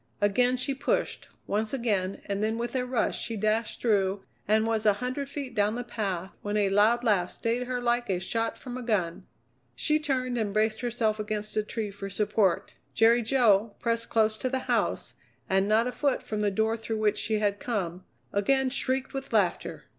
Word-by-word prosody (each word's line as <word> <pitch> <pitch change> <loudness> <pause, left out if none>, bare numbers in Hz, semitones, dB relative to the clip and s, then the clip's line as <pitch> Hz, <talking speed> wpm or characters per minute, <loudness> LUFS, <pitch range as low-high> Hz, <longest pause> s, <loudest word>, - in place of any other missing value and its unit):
Again 245 +5 +3
she 265 +2 -1
pushed, 270 - -1 0.2
once 215 +4 -1
again, 200 -6 -1
and 200 0 -2
then 220 +1 0
with 240 +2 -3
a 250 -1 0
rush 250 -2 0
she 230 - -4
dashed 215 +2 0
through 200 -4 +2 0.2
and 220 +1 +3
was 225 -1 0
a 210 - +5
hundred 255 +6 -4
feet 280 -3 -5
down 210 +1 +1
the 245 - -3
path 195 -6 -3
when 205 +1 -2
a 205 -2 +3
loud 215 +5 +4
laugh 195 -6 +2
stayed 240 +2 -2
her 250 -1 -1
like 240 -1 0
a 185 -2 +1
shot 225 +5 -2
from 250 -1 -7
a - - -5
gun. 200 -8 -1 0.5
She 305 0 +2
turned 255 -5 -1
and 205 -2 -2
braced 215 +1 +1
herself 230 -3 0
against 210 0 -3
a 215 - +3
tree 210 0 -4
for 195 0 -7
support. 205 -2 +1 0.2
Jerry 230 +2 +5
Jo, 225 -4 +3
pressed 230 -1 -1
close 220 -1 +2
to 255 - -1
the 260 0 -2
house - - 0 0.3
and 195 +1 +2
not 220 +2 +3
a 250 - -1
foot 280 0 0
from 215 - -3
the 210 -1 +2
door 220 +3 +1
through 225 0 -4
which 215 -1 +1
she 220 -1 0
had 205 -1 0
come, 185 -6 -3 0.3
again 260 +6 +2
shrieked 265 0 -1
with 270 -1 -5
laughter. - - 0
220 Hz, 200 wpm, -28 LUFS, 205-245 Hz, 0.5 s, a